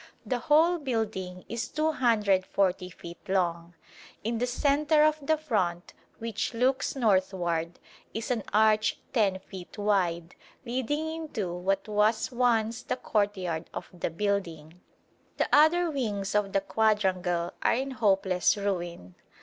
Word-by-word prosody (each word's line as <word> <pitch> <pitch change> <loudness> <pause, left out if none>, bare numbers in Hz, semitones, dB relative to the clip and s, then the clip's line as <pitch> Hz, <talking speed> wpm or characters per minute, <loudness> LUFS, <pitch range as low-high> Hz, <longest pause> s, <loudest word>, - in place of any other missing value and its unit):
The 250 -2 -1
whole 320 +7 +4
building 215 -9 -3
is 230 0 -3
240 205 - +1
feet 170 -1 -11
long. 170 -2 -1 0.5
In 225 +1 -1
the 245 - 0
centre 295 +4 +3
of 310 0 +3
the 315 +3 +1
front, 185 - -2 0.2
which 230 +1 -3
looks 260 +4 +1
northward, 185 -7 0 0.3
is 225 +3 -4
an 235 -3 0
arch 215 +1 +3 0.2
10 205 -6 +2
feet 185 0 -11
wide, 180 -5 0 0.3
leading 260 +6 -2
into 305 - -4
what 195 +3 -1
was 215 +2 +1
once 235 -2 +1
the - - -3
courtyard 190 -8 -1
of - - -6
the 175 - -3
building. 170 -3 -3 0.6
The - - +1
other 325 +3 +5
wings 210 -8 -2
of 210 -1 +1
the 195 - +2
quadrangle 185 -6 +1
are - - +3
in 270 +2 -2
hopeless 195 -6 +2
ruin. 175 - -3
210 Hz, 130 wpm, -28 LUFS, 185-250 Hz, 0.6 s, other